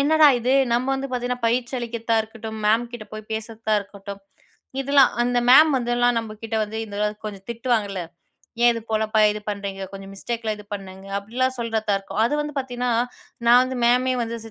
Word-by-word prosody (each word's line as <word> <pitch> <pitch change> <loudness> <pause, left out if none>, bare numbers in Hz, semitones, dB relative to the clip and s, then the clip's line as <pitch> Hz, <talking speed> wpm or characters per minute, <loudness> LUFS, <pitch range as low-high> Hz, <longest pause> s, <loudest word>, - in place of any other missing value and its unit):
என்னடா 310 +2 +5
இது, 245 +2 0 0.2
நம்ம 240 +2 +1
வந்து 270 +1 -3
பாத்தீங்கன்னா 250 -1 -2
பயிற்சி 240 +2 0
அளிக்கிர்த்தா 235 -1 -2
இருக்கட்டும், 220 0 -8
மேம்கிட்ட 235 +1 0
போய் 215 0 -9
பேசுர்த்தா 220 0 -3
இருக்கட்டும், 200 0 -9 0.6
இதெல்லாம் 275 0 +5
அந்த 245 0 +1
மேம் 305 +5 +8
வந்துலாம் 240 -1 +1
நம்ப 225 -1 -5
கிட்ட 225 0 -3
வந்து 215 +1 -7
இதலாம் 210 0 -2
கொஞ்சம் 200 -2 -7
திட்டுவாங்கள்ல, 225 -5 -1 0.6
"ஏன் 240 - +7
இது 230 - -4
போலப்பா, 220 0 +1
இது 210 - -6
பண்றீங்க, 200 -1 -5
கொஞ்சம் 195 0 -9
மிஸ்டேக்கலாம் 225 +1 -3
இது 210 - -11
பண்ணுங்க" 190 -1 -9
அப்டிலாம் 255 +6 -1
சொல்றதாருக்கும். 220 -3 -1
அது 240 - +1
வந்து 295 -1 -4
பாத்தீன்னா, 250 -2 -2 0.6
நான் 240 +1 +8
வந்து 255 0 -3
மேமே 250 +2 +3
வந்து 230 0 -3
230 Hz, 165 wpm, -23 LUFS, 210-245 Hz, 0.6 s, மேம்